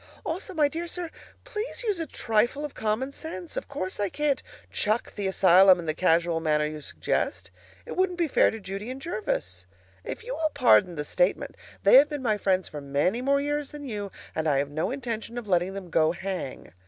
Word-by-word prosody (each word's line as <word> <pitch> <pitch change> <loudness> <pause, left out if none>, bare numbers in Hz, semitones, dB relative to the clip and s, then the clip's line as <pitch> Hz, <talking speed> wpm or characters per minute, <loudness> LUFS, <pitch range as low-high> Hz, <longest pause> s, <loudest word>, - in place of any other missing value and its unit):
Also, 360 +4 -3
my 300 -2 +4
dear 330 +4 -4
sir, 340 -1 -5 0.3
please 480 0 -4
use 415 -6 0
a 325 - -3
trifle 240 +5 0
of 295 - -7
common 220 +5 -1
sense. 185 - -7
Of - - -4
course 185 +2 -4
I 205 -1 +1
can't 295 +4 0 0.3
chuck 215 +3 0
the 205 -2 -2
asylum 190 0 +6
in 170 - -6
the 155 - 0
casual 170 0 +2
manner 150 -2 +1
you 150 0 -5
suggest. - - -2 0.3
It - - -6
wouldn't 370 -1 +1
be 340 -2 +1
fair - - +4
to 225 - -6
Judy 195 +3 -6
and 260 +1 -5
Jervis. 95 - -3 0.4
If - - -6
you - - -4
will 320 -6 0
pardon 205 -9 +5
the 150 -1 -3
statement, 180 +4 0 0.3
they 200 +6 +8
have 285 +2 +7
been 295 -3 -4
my 215 -4 +1
friends 190 -1 +1
for 150 - -7
many 145 - 0
more 280 +2 +3
years 290 0 -1
than 290 -1 -8
you, 205 -4 -4 0.2
and 160 0 -1
I 145 -3 +3
have 140 +1 -1
no 155 +6 -1
intention 235 -3 -4
of 240 -3 -5
letting 185 0 +1
them 185 -3 -7
go 160 0 +3
hang. 185 - -5
210 Hz, 210 wpm, -27 LUFS, 175-285 Hz, 0.4 s, they